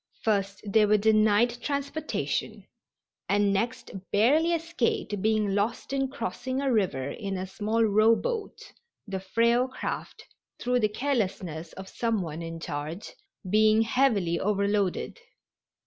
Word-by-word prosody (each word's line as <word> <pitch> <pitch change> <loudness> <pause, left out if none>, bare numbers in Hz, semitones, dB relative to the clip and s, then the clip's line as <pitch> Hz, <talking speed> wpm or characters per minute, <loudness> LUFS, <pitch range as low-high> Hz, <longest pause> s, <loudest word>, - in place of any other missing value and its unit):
First 200 -2 0
they 210 +1 +3
were 210 +1 +5
denied 220 +3 +3
transportation, 285 +2 -3 0.6
and 200 0 +3
next 235 +5 -2 0.2
barely 290 +11 +4
escaped 335 - -1
being 215 -1 +1
lost 215 +6 -1
in 270 -1 +1
crossing 260 0 -4
a 275 -2 +1
river 160 - 0
in 195 -3 -4
a 185 - -3
small 215 +4 0
rowboat, 225 - +1 0.3
the 195 -3 -4
frail 235 +6 +2
craft, 255 - -6 0.3
through 250 0 0
the 215 -2 +2
carelessness 190 - -2
of 190 0 -9
some 230 -3 -1
one 160 0 -6
in 165 0 -6
charge, 155 +3 -5 0.4
being 215 +3 +4
heavily 220 -8 +1
overloaded. 200 -1 0
215 Hz, 125 wpm, -27 LUFS, 195-245 Hz, 0.6 s, were